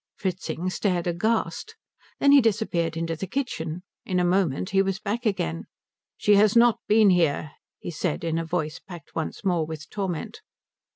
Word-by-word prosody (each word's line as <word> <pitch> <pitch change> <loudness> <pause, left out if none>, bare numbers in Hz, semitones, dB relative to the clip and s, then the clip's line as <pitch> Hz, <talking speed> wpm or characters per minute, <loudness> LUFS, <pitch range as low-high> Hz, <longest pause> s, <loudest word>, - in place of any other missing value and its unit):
Fritzing 185 -2 -3
stared 180 -3 0
aghast. 200 - -1 0.4
Then 280 - +5
he 285 -1 +8
disappeared 175 -7 0
into 165 0 -2
the 190 +4 -5
kitchen. 180 - -3 0.2
In 180 -1 -1
a 180 - +2
moment 180 -3 +1
he 195 0 +4
was 195 -1 -1
back 220 +3 -2
again. 85 - -2 0.5
"She 205 -1 +4
has 210 +1 +4
not 235 -1 +5
been 210 -2 +5
here," 160 -4 +1 0.3
he - - -6
said, 165 0 -2
in 165 0 0
a - - -2
voice 160 -2 -3
packed 175 -5 -12
once 165 +5 -4
more 175 -4 +2
with 155 -1 -8
torment. 190 -6 -4
180 Hz, 170 wpm, -25 LUFS, 165-205 Hz, 0.5 s, he